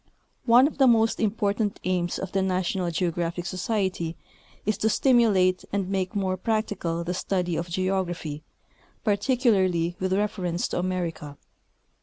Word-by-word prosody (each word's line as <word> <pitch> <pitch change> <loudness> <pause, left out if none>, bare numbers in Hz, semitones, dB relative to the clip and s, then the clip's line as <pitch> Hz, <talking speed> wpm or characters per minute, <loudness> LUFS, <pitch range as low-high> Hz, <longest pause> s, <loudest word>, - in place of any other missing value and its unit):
One 240 +3 +7
of 295 - -3
the 270 - +6
most 225 -2 +3
important 210 -1 0
aims 180 -1 -1
of 190 -1 -5
the 195 - +1
National 185 -1 0
Geographic 170 0 -2
Society 185 -3 -2 0.5
is 215 +1 +1
to 220 - +2
stimulate 210 -8 +3
and 195 -2 -1
make 190 +1 -2
more 190 -2 0
practical 195 -5 -1
the 175 +1 -2
study 180 -2 -1
of 170 +2 -3
geography, 175 -4 -2 0.6
j)articulaiiy 200 -6 +1
with 185 0 0
reference 190 -4 -1
to - - -2
America. 170 -5 -3
185 Hz, 135 wpm, -26 LUFS, 175-210 Hz, 0.6 s, One